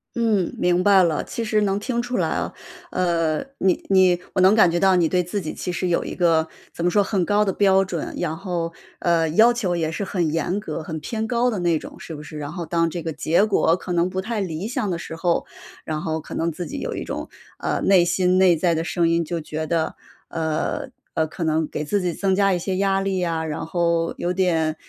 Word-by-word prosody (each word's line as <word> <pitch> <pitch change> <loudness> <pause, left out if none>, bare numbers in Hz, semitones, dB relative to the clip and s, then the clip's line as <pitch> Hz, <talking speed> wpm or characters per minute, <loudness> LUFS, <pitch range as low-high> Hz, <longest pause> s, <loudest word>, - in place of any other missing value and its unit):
嗯， 220 -6 +1
明 180 0 +2
白 200 -1 +6
了， 165 -3 +1
其 230 - -4
实 215 -1 +1
能 200 0 +1
听 235 +2 -2
出 245 +1 -2
来 - - +1
啊。 - - -2 0.4
呃， 170 -2 0
你 190 -2 +1
你 185 -2 +5
我 185 - +2
能 190 +3 +7
感 215 -5 +6
觉 175 - 0
到 190 0 +4
你 170 -3 +3
对 180 -1 +2
自 195 +3 -3
己 155 - -5
其 180 - -4
实 180 +1 -2
有 170 - +1
一 - - -5
个 165 -3 +2 0.2
怎 170 - -4
么 175 - +3
说， 205 -1 +4
很 190 -3 0
高 205 +3 +3
的 195 - 0
标 195 0 +4
准， 180 -4 -4
然 160 +1 -2
后， 170 -3 -3 0.3
呃， 170 -2 +2
要 220 +9 +6
求 210 -7 -1
也 160 -2 -1
是 200 - -3
很 175 -5 -1
严 170 +5 -1
格、 160 -5 -5
很 160 0 -5
偏 220 +6 -3
高 245 +1 +2
的 220 - -2
那 170 -3 +1
种， - - -11
是 165 - -8
不 150 - -8
是？ 155 0 -9
然 145 +2 -5
后 175 - -4
当 165 0 0
这 175 - -4
个 165 0 -3
结 165 +6 +2
果 195 -5 +3
可 180 0 -7
能 175 0 +2
不 185 +1 -3
太 225 +2 -3
理 185 0 -3
想 210 -5 -2
的 170 - -2
时 160 - -7
候， 170 +1 0 0.4
然 155 -1 -3
后 160 0 -2
可 - - -9
能 170 +1 0
自 170 +1 -6
己 - - -5
有 - - -4
一 - - -4
种， - - -5 0.3
呃， - - -2
内 185 -3 +5
心 180 +1 +2
内 185 -2 +5
在 170 +1 +1
的 160 - -1
声 170 -1 +1
音 170 0 +1
就 165 +1 -3
觉 155 +1 -4
得 160 0 -1 0.3
呃， 160 -1 -2 0.3
呃， 160 - +2
可 165 +2 -6
能 160 -1 +1
给 150 - -4
自 200 +7 0
己 175 -2 -1
增 190 +1 +1
加 195 -1 +3
一 175 - 0
些 185 +1 -2
压 195 0 +2
力 195 -1 -1
呀。 165 -2 -1
然 155 0 -4
后 170 -1 0
有 175 - -1
点 165 -4 +1
175 Hz, 265 characters per minute, -23 LUFS, 165-195 Hz, 0.4 s, 能